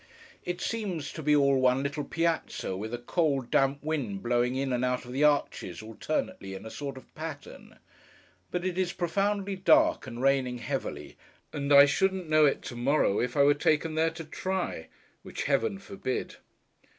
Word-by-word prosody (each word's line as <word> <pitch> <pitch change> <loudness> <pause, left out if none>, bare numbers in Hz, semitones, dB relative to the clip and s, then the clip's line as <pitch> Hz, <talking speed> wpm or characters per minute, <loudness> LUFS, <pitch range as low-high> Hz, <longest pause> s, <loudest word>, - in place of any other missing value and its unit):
It 175 0 -4
seems 190 -10 -3
to 160 - -6
be 150 0 +3
all 140 -2 +4
one 130 +1 +3
little 140 +1 -2
Piazza, 165 - -1
with 110 +4 -5
a 120 - -2
cold 135 0 0
damp 135 +1 +2
wind 135 -11 -3
blowing 120 +1 +1
in 135 -1 -1
and 125 0 0
out 125 0 -1
of 125 - -9
the 135 +4 0
arches, 140 - +1
alternately, 115 - -4
in 95 - -9
a 110 - -7
sort 140 -2 -6
of 130 - -14
pattern. 155 -2 -8 0.7
But 180 0 -3
it 185 0 -1
is 180 -2 0
profoundly 195 +3 -1
dark, 310 - +3
and 120 -1 -7
raining 130 -2 +2
heavily; 120 - -5 0.4
and 140 0 -3
I 140 0 +10
shouldn't 190 +4 0
know 155 -1 +5
it 140 - -1
to 120 - -7
morrow, 120 -4 +2
if 125 +3 -2
I 140 - +6
were 145 +1 +6
taken 155 +2 +1
there 160 +1 +2
to 165 0 -8
try. 175 - -3 0.3
Which - - -5
Heaven 150 +8 +1
forbid. 195 -8 -4
145 Hz, 180 wpm, -28 LUFS, 125-170 Hz, 0.7 s, I